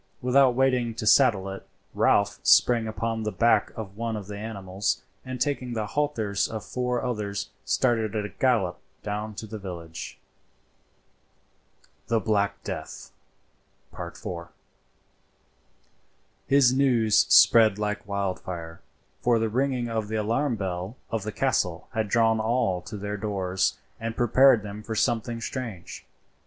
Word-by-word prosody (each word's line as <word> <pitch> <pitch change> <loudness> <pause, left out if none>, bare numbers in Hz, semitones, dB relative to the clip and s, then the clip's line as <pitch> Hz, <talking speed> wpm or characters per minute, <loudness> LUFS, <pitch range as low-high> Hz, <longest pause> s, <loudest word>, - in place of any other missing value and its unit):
Without 130 0 +4
waiting 125 -3 +1
to 110 - -4
saddle 105 -4 +4
it 95 0 -6 0.3
Ralph 100 0 +2
sprang 115 -2 +4
upon 115 +1 -2
the 105 -1 -2
back 115 -2 +3
of 100 -3 -7
one 115 -1 -2
of 105 -2 -6
the 105 +1 -7
animals, 100 -2 -3 0.2
and 130 -1 -6
taking 130 -3 -1
the 110 -2 -2
halters 110 -7 -1
of 110 -2 -6
four 125 0 -2
others 105 -5 -3
started 115 -4 +1
at 105 -1 -1
a - - -5
gallop 100 -5 +1 0.2
down 105 +1 -4
to 110 - -6
the 110 0 -7
village. 85 -4 -7 1.9
THE 115 -1 +2
BLACK 105 -3 0
DEATH.—IV. 85 -1 -9 2.0
His 135 -2 +5
news 125 -5 +3
spread 110 -3 +7
like 105 -1 -3
wildfire; 90 -4 -4 0.4
for 120 -1 +3
the 115 0 0
ringing 125 +1 0
of 110 -2 -2
the 110 - -4
alarm 115 +5 0
bell 95 +2 -4
of 115 -2 -1
the 110 +2 -4
castle 100 -9 -1
had 110 -2 -1
drawn 115 0 +3
all 110 -5 0
to 105 - -8
their 105 +1 -4
doors 95 -3 -1 0.2
and 115 0 -4
prepared 120 -1 +5
them 105 0 -7
for 110 +1 -5
something 115 0 0
strange. 115 -9 -6
110 Hz, 135 wpm, -26 LUFS, 100-120 Hz, 2.0 s, spread